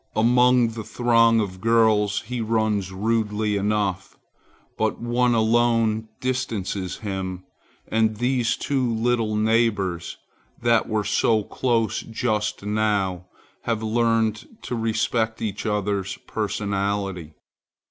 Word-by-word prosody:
Among 125 +1 +4
the 115 -1 -6
throng 115 -1 +3
of 95 -3 -3
girls 110 -2 +3
he 120 +1 -5
runs 110 -4 0
rudely 105 +1 0
enough, 100 -2 -1 0.6
but 110 0 -1
one 120 +1 +1
alone 115 -1 +2
distances 110 -8 -2
him; 95 -2 -4 0.4
and 110 -1 +1
these 120 0 +1
two 130 -5 -1
little 115 -1 0
neighbors, 105 -6 0 0.4
that 120 -1 +2
were 110 -1 0
so 110 +1 +2
close 115 0 0
just 110 -3 -2
now, 100 -4 0 0.4
have 115 -2 -1
learned 115 -1 +1 0.2
to 125 - -3
respect 115 0 0
each 105 0 -3
other's 100 -2 -1
personality. 100 -5 -2
110 Hz, 105 wpm, -23 LUFS, 100-115 Hz, 0.6 s, Among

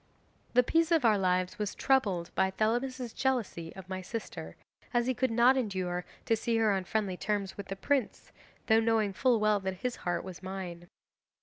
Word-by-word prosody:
'The 250 - +7
peace 330 +5 +2
of 320 -6 +4
our 220 -2 +6
lives 185 0 0
was 210 -1 -2
troubled 200 -11 +1
by 190 - +2
Thelamis's 240 +4 -1
jealousy 225 -11 -1
of 190 -1 -10
my 185 0 -4
sister, 225 +4 -6 0.4
as 240 0 +3
he 255 - +1
could 260 +1 0
not 240 +3 +5
endure 185 -7 -2 0.2
to 225 - +3
see 230 +1 0
her 220 -2 +3
on 190 -2 0
friendly 205 -2 -1
terms 200 0 -2
with 200 -1 -7
the 195 - -4
prince, 265 +4 -1 0.3
though 220 0 +5
knowing 220 -3 +2
full 245 +2 +3
well 210 -1 +3
that 190 -1 -4
his 250 - -1
heart 175 -1 -2
was 185 -2 -9
mine. 185 -2 -6
210 Hz, 190 wpm, -30 LUFS, 190-240 Hz, 0.4 s, The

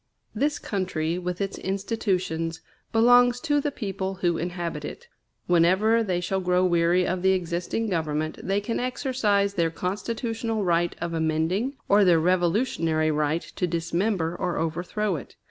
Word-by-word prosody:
This 290 +1 0
country, 180 -4 -2
with 180 0 -4
its 195 0 -3
institutions, 190 -5 -2 0.3
belongs 245 +2 +5
to 290 -2 +1
the 290 - 0
people 195 -6 -4
who 175 -2 0
inhabit 170 -3 -4
it. 475 - -8 0.4
Whenever 190 +7 +4
they 185 -4 -1
shall 190 +2 -1
grow 180 0 +2
weary 175 +1 +3
of 185 0 -1
the 190 +1 +4
existing 180 +5 -2
government, 155 -4 -2
they 195 +1 0
can 230 +2 -2
exercise 245 -6 0
their 170 -4 +1
constitutional 225 +5 -3
right 175 -1 +1
of 170 -1 -3
amending, 165 - 0
or 205 +1 +5
their 175 -3 +5
revolutionary 170 -2 +1
right 150 +2 0
to 180 - -3
dismember 170 +1 -1
or 175 0 -2
overthrow 175 +4 -1
it. 135 - -11
180 Hz, 145 wpm, -25 LUFS, 170-210 Hz, 0.4 s, belongs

